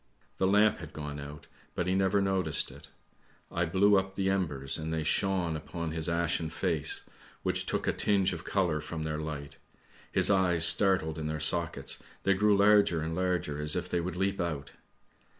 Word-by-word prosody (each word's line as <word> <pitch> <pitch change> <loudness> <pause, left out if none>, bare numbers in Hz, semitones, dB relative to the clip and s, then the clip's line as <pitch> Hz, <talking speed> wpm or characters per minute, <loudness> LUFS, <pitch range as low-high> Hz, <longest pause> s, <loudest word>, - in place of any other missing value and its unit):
The 95 - +1
lamp 105 0 +3
had 80 -2 -10
gone 75 -1 -6
out, 75 +1 -9 0.3
but 90 - -1
he 90 - 0
never 95 +1 +2
noticed 95 -5 +2
it; - - -13 0.6
I 85 - 0
blew 95 +4 +4
up 95 0 -6
the 95 -1 0
embers 75 -8 -2
and 80 +1 -4
they 80 -1 -1
shone 90 0 0
upon 80 +1 -5
his 80 +1 0
ashen 85 -1 -1
face 80 - 0 0.4
which - - -1
took - - -1
a - - +1
tinge 100 -3 +1
of - - -7
colour 85 -6 0
from 80 +1 -6
their 80 -1 -3
light, 70 -2 -6 0.5
his - - +4
eyes 90 -4 +3
startled 85 -2 +4
in 75 - -3
their 80 0 -3
sockets, 85 +2 0 0.2
they 100 - +3
grew 105 +1 +3
larger 100 -5 +4
and 80 +1 -3
larger 90 -5 -1
as 75 0 0
if - - -3
they 85 - 0
would 90 0 -4
leap 95 +1 -1
out. 80 -5 -4
85 Hz, 185 wpm, -29 LUFS, 80-95 Hz, 0.6 s, blew